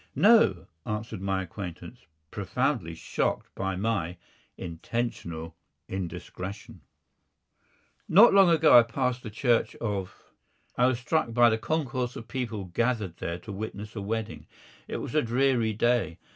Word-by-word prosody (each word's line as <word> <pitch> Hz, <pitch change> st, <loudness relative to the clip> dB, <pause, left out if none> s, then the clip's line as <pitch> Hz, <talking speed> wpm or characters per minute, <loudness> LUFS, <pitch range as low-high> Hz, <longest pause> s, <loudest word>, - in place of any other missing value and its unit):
"No," 145 Hz, -, +5 dB, 0.2 s
answered 105 Hz, 0 st, -4 dB
my 95 Hz, -1 st, -1 dB
acquaintance, 90 Hz, +4 st, -9 dB, 0.2 s
profoundly 80 Hz, 0 st, -1 dB
shocked -, -, -2 dB
by 95 Hz, -1 st, -2 dB
my 95 Hz, -4 st, -1 dB, 0.4 s
intentional 85 Hz, -3 st, -4 dB, 0.3 s
indiscretion. 95 Hz, +1 st, -6 dB, 1.3 s
Not 205 Hz, +8 st, +8 dB
long 195 Hz, -2 st, +7 dB
ago 160 Hz, -2 st, +6 dB
I 120 Hz, -, +11 dB
passed 125 Hz, +2 st, -1 dB
the 110 Hz, -, -7 dB
Church 120 Hz, +2 st, +1 dB
of. 100 Hz, -5 st, -3 dB, 0.6 s
I 125 Hz, -, +4 dB
was 130 Hz, -2 st, +1 dB
struck 125 Hz, -1 st, -1 dB
by 120 Hz, -1 st, +6 dB
the 110 Hz, -, 0 dB
concourse 130 Hz, -4 st, -2 dB
of 115 Hz, -, -8 dB
people 115 Hz, -6 st, -4 dB
gathered 105 Hz, -1 st, -1 dB
there 85 Hz, +1 st, -4 dB
to 105 Hz, -, -8 dB
witness 105 Hz, +1 st, -6 dB
a 105 Hz, -, -4 dB
wedding. 110 Hz, +2 st, -4 dB, 0.4 s
It -, -, -4 dB
was -, -, -6 dB
a 155 Hz, -, +3 dB
dreary 120 Hz, -2 st, +1 dB
day. 120 Hz, -5 st, +1 dB
110 Hz, 135 wpm, -27 LUFS, 95-125 Hz, 1.3 s, I